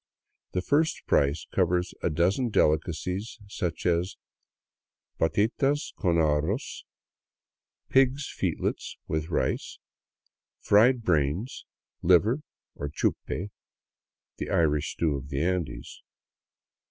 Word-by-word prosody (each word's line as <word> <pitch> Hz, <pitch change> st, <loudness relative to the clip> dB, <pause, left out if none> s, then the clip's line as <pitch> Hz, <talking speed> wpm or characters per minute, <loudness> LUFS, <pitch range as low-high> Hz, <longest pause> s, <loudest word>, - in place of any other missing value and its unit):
The 90 Hz, -, -1 dB
first 155 Hz, +6 st, +1 dB
price 70 Hz, +2 st, +2 dB
covers 90 Hz, -1 st, +1 dB
a -, -, +1 dB
dozen 90 Hz, -, +1 dB
delicacies, 90 Hz, +5 st, 0 dB
such 90 Hz, -4 st, -4 dB
as 90 Hz, +2 st, +1 dB, 0.5 s
*' -, -, -52 dB
patitas 125 Hz, -, +1 dB
con 85 Hz, -4 st, +1 dB
arroz 80 Hz, -, 0 dB, 0.5 s
— -, -, -62 dB
pigs* 135 Hz, +1 st, +3 dB
f -, -, -19 dB
eetlets -, -, -1 dB
with 80 Hz, +1 st, -2 dB
rice," 80 Hz, -, -1 dB, 0.8 s
fried 115 Hz, +4 st, +4 dB
brains, 85 Hz, -, 0 dB, 0.4 s
liver, 100 Hz, -, +4 dB, 0.3 s
or 70 Hz, -, -5 dB
chupe, 95 Hz, +6 st, -2 dB, 0.9 s
the -, -, -4 dB
Irish 75 Hz, -1 st, +1 dB
stew 80 Hz, -4 st, 0 dB
of 70 Hz, 0 st, -6 dB
the 70 Hz, -2 st, -2 dB
Andes. 85 Hz, -9 st, -3 dB
90 Hz, 105 wpm, -27 LUFS, 80-110 Hz, 0.9 s, fried